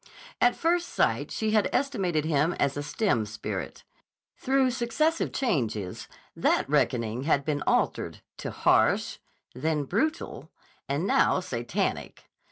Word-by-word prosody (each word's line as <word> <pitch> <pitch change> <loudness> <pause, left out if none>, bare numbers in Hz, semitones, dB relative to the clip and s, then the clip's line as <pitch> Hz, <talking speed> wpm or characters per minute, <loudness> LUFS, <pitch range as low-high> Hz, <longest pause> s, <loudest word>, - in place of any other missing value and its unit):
At 245 - +4
first 345 +1 +1
sight - - +1
she 220 -1 -1
had 215 -2 +3
estimated 190 - 0
him 155 +2 +2
as 140 -1 0
a 145 - -2
stern 145 - 0
spirit. 110 - -5 0.5
Through 265 -1 +2
successive 260 +7 0
changes 110 - -2 0.3
that - - +2
reckoning 115 +2 0
had 140 -3 +2
been 145 -2 -1
altered - - 0 0.2
to - - -5
"harsh," - - +2 0.3
then 150 +3 -1
"brutal," 305 - -2 0.4
and 145 +6 0
now 195 - +3
"Satanic." 120 -9 -3
165 Hz, 125 wpm, -27 LUFS, -, 0.5 s, At